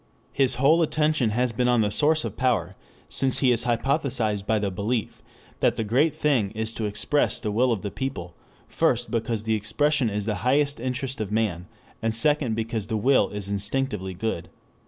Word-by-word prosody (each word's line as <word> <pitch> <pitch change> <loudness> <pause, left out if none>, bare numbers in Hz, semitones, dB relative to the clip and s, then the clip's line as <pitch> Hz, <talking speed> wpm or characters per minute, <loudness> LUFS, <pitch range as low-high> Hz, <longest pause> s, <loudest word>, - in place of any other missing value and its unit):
His 135 -2 +1
whole 150 +6 +4
attention 155 -5 +1
has 120 +3 0
been 125 +2 0
on 120 -2 +3
the 105 -1 +1
source 155 +5 +3
of - - -5
power, 115 -9 0 0.3
since 135 -2 +1
he 130 -2 +3
is 120 - +2
hypnotized 120 -4 0
by 110 - +2
the 100 -2 -1
belief 105 +4 -3 0.4
that - - +2
the 115 - 0
great 130 +9 +2
thing 135 -9 +1
is 110 +1 -2
to 110 - -3
express 105 +8 0
the 105 - -3
will 125 +4 +2
of 110 -5 -2
the 100 - -3
people, 110 -11 -5 0.3
first 120 0 0
because 115 -2 -2
expression 115 +5 +1
is 105 -1 -3
the 105 -3 -1
highest 140 +3 +1
interest 130 0 -3
of 105 -2 -4
man, 100 -6 -1 0.3
and 115 0 -1
second 140 -2 +2
because 110 -2 -2
the 110 -1 -1
will 130 +6 +3
is 105 -1 -5
instinctively 100 -1 -2
good. 95 -3 -3
115 Hz, 185 wpm, -25 LUFS, 105-135 Hz, 0.4 s, whole